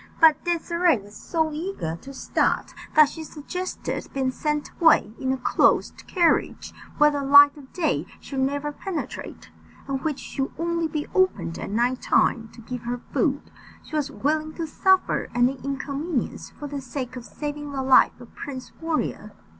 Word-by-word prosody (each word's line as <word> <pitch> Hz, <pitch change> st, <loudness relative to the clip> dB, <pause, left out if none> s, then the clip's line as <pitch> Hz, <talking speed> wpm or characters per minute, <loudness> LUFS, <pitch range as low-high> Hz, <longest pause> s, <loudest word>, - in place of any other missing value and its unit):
But 320 Hz, -2 st, +6 dB
Désirée 340 Hz, -3 st, +2 dB
was 205 Hz, +1 st, -14 dB
so 320 Hz, +6 st, -1 dB
eager 310 Hz, -, -3 dB
to 275 Hz, -, -10 dB
start, 270 Hz, -, 0 dB, 0.2 s
that 305 Hz, -1 st, +8 dB
she 320 Hz, +3 st, -7 dB
suggested 360 Hz, +5 st, -5 dB
being 265 Hz, -1 st, +1 dB
sent 300 Hz, +2 st, -2 dB
away 305 Hz, -10 st, +5 dB
in 260 Hz, -1 st, 0 dB
a 265 Hz, -, 0 dB
closed 250 Hz, -, +2 dB
carriage, 345 Hz, -3 st, +1 dB, 0.2 s
where 295 Hz, 0 st, +6 dB
the 285 Hz, -1 st, -2 dB
light 285 Hz, +1 st, +8 dB
of 280 Hz, -3 st, -14 dB
day 340 Hz, -3 st, 0 dB
should 270 Hz, -, -5 dB
never 285 Hz, +2 st, 0 dB
penetrate, 345 Hz, +3 st, -6 dB, 0.4 s
and 270 Hz, -1 st, -2 dB
which 300 Hz, -1 st, -1 dB
should 270 Hz, -1 st, -3 dB
only 335 Hz, 0 st, 0 dB
be 300 Hz, -1 st, -3 dB
opened 375 Hz, -, +1 dB
at -, -, -5 dB
night 240 Hz, +4 st, +1 dB
time 225 Hz, -2 st, +2 dB
to 235 Hz, -, -12 dB
give 245 Hz, +2 st, -6 dB
her 240 Hz, +1 st, -3 dB
food. -, -, 0 dB, 0.3 s
She -, -, -8 dB
was 295 Hz, -2 st, 0 dB
willing 310 Hz, +2 st, -1 dB
to 335 Hz, -, -3 dB
suffer 380 Hz, +4 st, +2 dB
any 250 Hz, +2 st, +2 dB
inconvenience 275 Hz, +1 st, -3 dB
for 295 Hz, -, -10 dB
the 285 Hz, -1 st, -5 dB
sake 255 Hz, -1 st, -5 dB
of 250 Hz, -, -7 dB
saving 295 Hz, +2 st, -6 dB
the 270 Hz, -1 st, -2 dB
life 260 Hz, -1 st, +5 dB
of 245 Hz, -, -14 dB
Prince 260 Hz, -3 st, -7 dB
Warrior. 310 Hz, -9 st, -2 dB
285 Hz, 170 wpm, -25 LUFS, 260-315 Hz, 0.4 s, that